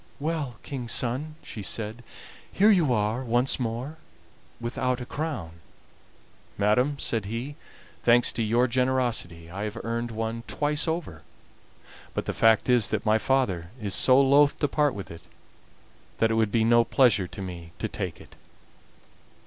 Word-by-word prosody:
"Well, 150 Hz, -5 st, -2 dB
King's 125 Hz, -4 st, -2 dB
son," 135 Hz, +6 st, -1 dB
she 105 Hz, -, -8 dB
said, 110 Hz, +4 st, -4 dB, 0.5 s
"here 210 Hz, +3 st, +5 dB
you 170 Hz, -9 st, +3 dB
are 110 Hz, +2 st, 0 dB
once 120 Hz, +3 st, +1 dB
more, 125 Hz, +6 st, -3 dB, 0.6 s
without 125 Hz, +2 st, -1 dB
a 125 Hz, -, -6 dB
crown." 110 Hz, -, -5 dB, 1.0 s
"Madam," 125 Hz, +8 st, +2 dB
said 115 Hz, -6 st, -2 dB
he, 120 Hz, +8 st, -5 dB, 0.5 s
"thanks 120 Hz, 0 st, +4 dB
to -, -, -3 dB
your 115 Hz, +3 st, +3 dB
generosity 120 Hz, -10 st, -1 dB
I 100 Hz, +3 st, -5 dB
have 105 Hz, +1 st, -5 dB
earned 115 Hz, +1 st, -2 dB
one 115 Hz, +1 st, -3 dB
twice 150 Hz, +2 st, 0 dB
over; 160 Hz, -, -3 dB, 0.9 s
but -, -, -2 dB
the -, -, -2 dB
fact 110 Hz, -1 st, +4 dB
is 120 Hz, -5 st, +4 dB
that -, -, -2 dB
my 110 Hz, +1 st, +3 dB
father 100 Hz, -11 st, 0 dB
is 100 Hz, -3 st, -3 dB
so 130 Hz, +6 st, +5 dB
loth 140 Hz, +1 st, +5 dB
to 145 Hz, -, +1 dB
part 145 Hz, -1 st, +1 dB
with 100 Hz, -, -7 dB
it 85 Hz, 0 st, -10 dB, 1.0 s
that 115 Hz, 0 st, +2 dB
it -, -, +2 dB
would 110 Hz, -2 st, +1 dB
be 115 Hz, 0 st, +2 dB
no 120 Hz, +1 st, +5 dB
pleasure 115 Hz, -7 st, +3 dB
to 100 Hz, -, -8 dB
me 85 Hz, -2 st, -8 dB
to -, -, -2 dB
take -, -, -5 dB
it." -, -, -15 dB
120 Hz, 155 wpm, -26 LUFS, 110-135 Hz, 1.0 s, here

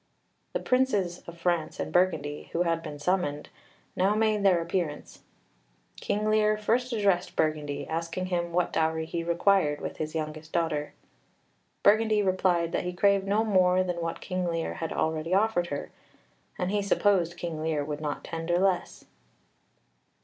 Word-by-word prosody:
The -, -, 0 dB
Princes 210 Hz, -9 st, +1 dB
of 170 Hz, 0 st, -9 dB
France 170 Hz, -2 st, -1 dB
and -, -, -4 dB
Burgundy, 155 Hz, -5 st, +1 dB
who 170 Hz, -, +2 dB
had 165 Hz, -1 st, 0 dB
been 150 Hz, -2 st, -7 dB
summoned, 150 Hz, -2 st, -1 dB, 0.5 s
now 195 Hz, +3 st, +2 dB
made 215 Hz, -1 st, +2 dB
their 190 Hz, -3 st, +4 dB
appearance. 170 Hz, -3 st, -3 dB, 0.8 s
King 210 Hz, +1 st, -1 dB
Lear 215 Hz, 0 st, +3 dB
first 245 Hz, +4 st, 0 dB
addressed 200 Hz, -5 st, +1 dB
Burgundy, 145 Hz, -3 st, -1 dB
asking 165 Hz, +3 st, -3 dB
him 175 Hz, -2 st, -2 dB
what 175 Hz, +1 st, 0 dB
dowry 160 Hz, 0 st, +1 dB
he 165 Hz, +1 st, -3 dB
required 170 Hz, -3 st, +2 dB
with -, -, -6 dB
his 155 Hz, +1 st, -4 dB
youngest 155 Hz, 0 st, -5 dB
daughter. 160 Hz, -3 st, -1 dB, 0.9 s
Burgundy 215 Hz, 0 st, +4 dB
replied 185 Hz, -3 st, +1 dB
that -, -, -1 dB
he 180 Hz, 0 st, -3 dB
craved 195 Hz, +2 st, +2 dB
no 210 Hz, +3 st, +2 dB
more 185 Hz, -3 st, +3 dB
than 175 Hz, -2 st, -3 dB
what 165 Hz, 0 st, -4 dB
King 185 Hz, -1 st, -2 dB
Lear 165 Hz, -1 st, -2 dB
had 165 Hz, -, -4 dB
already 160 Hz, +3 st, 0 dB
offered 195 Hz, -4 st, +2 dB
with 145 Hz, -, -2 dB
her, -, -, -10 dB, 0.7 s
and 180 Hz, +1 st, -1 dB
he 205 Hz, 0 st, +1 dB
supposed 195 Hz, -4 st, +2 dB
King 165 Hz, -3 st, -4 dB
Lear 155 Hz, -2 st, -1 dB
would 150 Hz, 0 st, -5 dB
not 145 Hz, -2 st, -3 dB
tender 165 Hz, +1 st, -2 dB
less. 185 Hz, -1 st, 0 dB
175 Hz, 160 wpm, -28 LUFS, 160-195 Hz, 0.9 s, their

